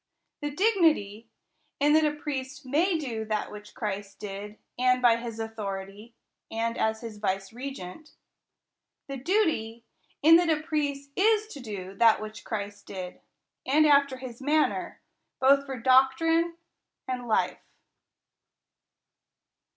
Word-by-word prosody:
The 295 - -2
8 - - -2
THE 290 - -10
COUNTRY 385 - 0
PARSON. 450 +1 +5
dignity, 225 -8 +2 0.5
in 295 +1 +4
that 315 0 +5
a 300 0 0
priest 275 -1 -5
may 325 +7 +2
do 240 -8 -4
that 215 -1 -2
which 210 0 -11
Christ 205 -2 -4
did, 205 +1 -7 0.2
and 255 0 +4
by 240 -2 +5
his 230 -1 -6
authority, 210 0 -6 0.3
and 230 +1 -2
as 220 0 0
his 225 -3 -8
vicegerent. 205 - -5 0.9
The 275 -1 -5
duty, 265 - 0 0.4
in 325 +2 +9
that 345 -1 +2
a 315 -1 +2
priest 285 -3 -2
is 430 +2 +3
to 295 - -9
do 200 -6 -7
that 230 -2 +6
which 215 0 -8
Christ 205 -2 -5
did, 185 -2 -7 0.4
and 300 +4 +4
after 280 -2 +4
his 255 -1 -9
manner, 300 +3 0 0.4
both 275 +1 +4
for 265 -1 -4
doctrine 270 +7 +3 0.5
and 250 -1 -3
hfe. 225 - +1
255 Hz, 140 wpm, -27 LUFS, 215-295 Hz, 0.9 s, in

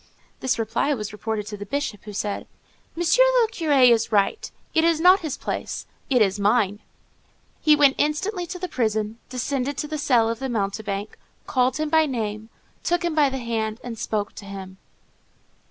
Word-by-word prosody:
This 260 -1 0
reply 230 +6 0
was 210 -3 -6
reported 215 0 -3
to 210 0 -6
the 205 - -6
Bishop, 255 -5 -3
who 210 - -7
said, 205 0 -3 0.5
"Monsieur 345 +9 +4 0.2
le 460 - +4
Curé 285 - +4
is 230 0 +2
right: 205 - +1 0.2
it 320 - +3
is 330 -1 +3
not 365 +3 +6
his 315 -6 -4
place; - - -4 0.2
it 250 -5 +5
is 195 0 -1
mine." 205 -1 +2 0.8
He 305 -1 +6
went 285 -2 +5
instantly 350 +5 0
to 365 - -6
the 365 +1 -4
prison, 220 -4 -1
descended 265 +2 -2
to 300 - -2
the 305 0 -4
cell 240 -5 +3
of 230 0 -2
the 265 - -3
"mountebank," 205 -2 -3 0.3
called 255 -1 +1
him 310 0 -1
by 315 0 +4
name, 220 -4 -4 0.3
took 350 0 0
him 340 - 0
by 300 -3 +4
the 265 - -4
hand, 225 -2 -2
and 240 -2 -5
spoke 210 -2 -2
to 205 - -8
him. 190 -1 -8
245 Hz, 185 wpm, -24 LUFS, 215-300 Hz, 0.8 s, not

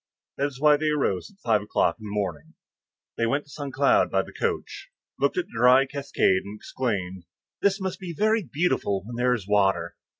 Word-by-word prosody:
That 140 - +1
is 135 -3 -10
why 150 0 +5
they 155 +1 0
rose 135 -11 0
at 200 - -24
five 110 -3 +3
o'clock 105 -4 0
in 110 - -10
the 105 - -6
morning. 85 -7 -4 0.6
Then - - -4
they - - +3
went 140 +4 0
to 145 - -19
Saint 140 -2 -6
Cloud 140 0 +4
by - - +1
the - - -13
coach, - - -3 0.3
looked - - +1
at 365 - 0
the - - -21
dry 125 +2 +5
cascade 135 -9 +1
and 100 +2 -8
exclaimed, 95 -7 -3 0.4
"This 195 0 +2
must 190 -2 -4
be 185 -3 -6
very 215 +6 +2
beautiful 140 - -1
when 120 +2 -7
there 125 +1 +2
is 100 -5 -7
water!" 95 -4 +1
125 Hz, 210 wpm, -25 LUFS, 100-150 Hz, 0.6 s, why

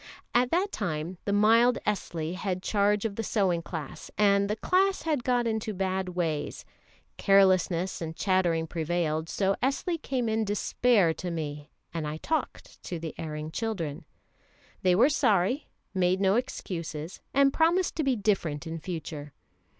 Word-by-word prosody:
At 245 +1 +3
that 375 +6 +1
time 170 -2 -3
the 200 - 0
mild 230 +4 +5
Esli 170 -5 -2
had 185 -1 -3
charge 205 0 +2
of 200 -3 -3
the 225 - -1
sewing 190 -5 +1
class, 160 -3 -7
and 200 -1 +4
the 210 - 0
class 380 - +2
had 300 -6 0
got 245 -1 +2
into 220 -2 -2
bad 190 0 -1
ways; 165 -4 -2 0.5
carelessness 190 -3 +3
and 160 -1 -4
chattering 175 -4 +1
prevailed, 160 -1 -1
so 195 -1 +1
Esli 295 +6 0
came 255 -3 -1
in 220 0 +1
despair 205 -2 +2
to 180 - -5
me, 150 -3 -5 0.2
and 160 -3 -3
I 150 +1 -4
talked 315 - -3
to 175 - -4
the 160 -1 -6
erring 155 -1 -5
children. 170 -8 -3 0.8
They 180 -1 +4
were 235 +8 +6
sorry, 245 - +2 0.3
made 185 -1 +2
no 195 -1 +3
excuses, 170 - -4
and 275 0 +4
promised 340 +3 +2
to 315 - +1
be 270 -2 +2
different 185 -8 0
in 165 0 -5
future. 155 -4 -6
190 Hz, 155 wpm, -28 LUFS, 165-225 Hz, 0.8 s, were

